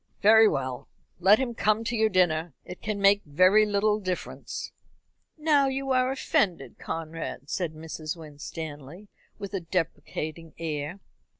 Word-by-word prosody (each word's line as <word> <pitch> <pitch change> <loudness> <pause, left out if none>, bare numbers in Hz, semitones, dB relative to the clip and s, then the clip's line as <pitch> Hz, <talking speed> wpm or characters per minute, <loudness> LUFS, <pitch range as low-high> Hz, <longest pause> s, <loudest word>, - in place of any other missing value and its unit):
"Very 220 +1 +8
well, 130 -2 -3 0.3
let 195 +4 +6
him 250 -1 -2
come 215 0 +1
to 235 +1 -2
your 220 -1 +3
dinner. 175 -4 +1
It 180 - -9
can 210 -1 -3
make 200 +1 +5
very 185 +8 +4
little 210 +1 +2
difference." 185 -3 -5 0.7
"Now 300 -3 +3
you 270 0 -2
are 255 0 +3
offended, 175 - 0
Conrad," 160 -3 -5
said 170 -4 -2
Mrs. 155 +1 -6
Winstanley, 155 +3 -8 0.3
with 200 0 -7
a 195 - 0
deprecating 165 -1 -4
air. 160 +3 -4
185 Hz, 135 wpm, -27 LUFS, 160-215 Hz, 0.7 s, Very